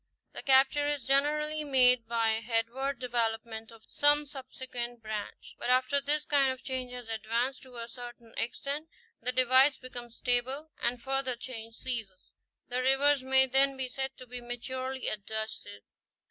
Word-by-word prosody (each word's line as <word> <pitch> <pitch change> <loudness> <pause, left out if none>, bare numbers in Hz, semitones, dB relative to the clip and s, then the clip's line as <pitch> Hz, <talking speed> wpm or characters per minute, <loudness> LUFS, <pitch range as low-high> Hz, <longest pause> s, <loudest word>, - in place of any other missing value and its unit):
The - - -4
capture 275 +2 +4
is 290 -4 -2
generally 300 +3 +2
made 250 -4 +4
by 230 -1 +2
the 220 - -1
headward 245 +5 0
development 225 -2 -2
of 225 -1 -15
some 295 +1 +4
subsequent 255 -4 -7
branch. 215 -1 -6
But - - -3
after 255 +3 +3
this 295 +2 0
kind 275 -2 +3
of 260 0 -8
change 255 -2 -3
has 245 -2 -7
advanced 230 +4 -1
to 255 -2 -13
a 230 0 -5
certain 240 -1 -10
extent, 285 +6 -3 0.3
the 250 +2 +1
divides 260 +2 +5
become 245 -2 -8
stable, 255 +6 -1
and 240 +1 +1
further 265 0 -1
change 230 -2 -7
ceases. 225 -8 -4 0.4
The 250 +1 -1
rivers 270 +1 +3
may 265 0 +5
then 270 +1 +3
be 260 -1 -2
said 265 +1 -3
to 255 - -10
be 250 0 -7
maturely 255 +2 -4
adjusted. 215 - -4
255 Hz, 160 wpm, -30 LUFS, 235-270 Hz, 0.4 s, divides